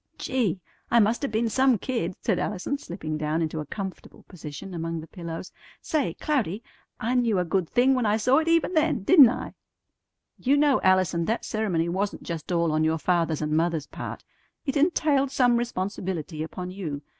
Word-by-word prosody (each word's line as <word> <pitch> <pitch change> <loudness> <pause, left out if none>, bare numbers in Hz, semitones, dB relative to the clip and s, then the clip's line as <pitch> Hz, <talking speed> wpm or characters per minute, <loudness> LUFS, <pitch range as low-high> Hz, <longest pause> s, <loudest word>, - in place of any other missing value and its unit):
"Gee! 225 -9 -1 0.3
I 235 - +5
must 225 +5 +2
'a' - - +1
been 225 0 0
some 260 +1 +3
kid!" 190 -6 -3
said - - 0
Allison, 210 +8 -2
slipping 155 - -5
down 155 +1 -1
into 160 0 -3
a 150 - -5
comfortable 190 +3 -7
position 175 +1 -9
among 165 -1 -3
the 160 - -8
pillows. 170 +1 -7 0.3
"Say, 275 - -1
Cloudy, 230 - -1 0.4
I 230 +3 -1
knew 235 -5 +2
a 180 - +1
good 175 0 0
thing 255 +2 +4
when 250 -4 +1
I 210 +1 +2
saw 250 +6 +4
it 320 - -2
even 330 +2 +2
then, 310 - +1
didn't 285 - +8
I?" 255 +1 -5 0.9
"You 275 +3 +3
know, 285 -2 +3
Allison, 185 -3 +3
that 225 +5 -1
ceremony 195 -7 0
wasn't 195 +4 -2
just 165 0 -5
all 170 -2 +2
on 155 0 +1
your 160 +1 +2
father's 165 -2 0
and 150 - -2
mother's 165 -2 +1
part; - - -7 0.4
it 270 - -2
entailed 290 -3 +2
some 245 -2 +3
responsibility 185 -8 -3
upon 180 +3 -5
you. 155 -7 -5
195 Hz, 185 wpm, -26 LUFS, 165-250 Hz, 0.9 s, didn't